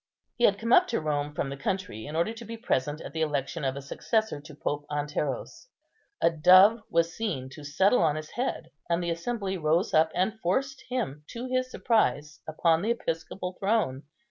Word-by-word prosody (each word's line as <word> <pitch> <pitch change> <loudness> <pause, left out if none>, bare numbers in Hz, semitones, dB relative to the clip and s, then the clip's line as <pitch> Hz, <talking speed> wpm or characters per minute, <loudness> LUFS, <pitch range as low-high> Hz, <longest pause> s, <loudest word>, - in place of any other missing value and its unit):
He 240 - +2
had 200 - +4
come 230 +3 0
up 360 +5 +7
to - - 0
Rome 150 -1 -2
from 135 - -1
the - - -4
country, 140 - -3
in 150 - -6
order 170 +7 +1
to 230 +1 -9
be 230 +1 -7
present 145 - -1
at - - -8
the 160 - -2
election 150 +1 -1
of 135 -1 0
a 140 - -6
successor 220 +4 -1
to 150 0 -12
Pope 145 0 -3
Anteros. 145 - -3 0.5
A 170 - +4
dove 185 +7 +7
was 170 0 +1
seen 160 -13 -3
to 145 +3 -11
settle 190 - +3
on 155 -3 +3
his 155 0 -6
head, 255 +2 -3 0.2
and 170 +1 +1
the 170 - -1
assembly 190 +2 -3
rose 160 +5 +1
up 160 +1 +5
and 205 +5 0
forced 265 +9 -1
him, 195 - -3
to 240 +2 -6
his 255 0 -1
surprise, 150 - +1
upon 160 +1 +2
the 215 - -1
episcopal 180 -4 -3
throne. 195 -11 +1
170 Hz, 195 wpm, -28 LUFS, 150-220 Hz, 0.5 s, up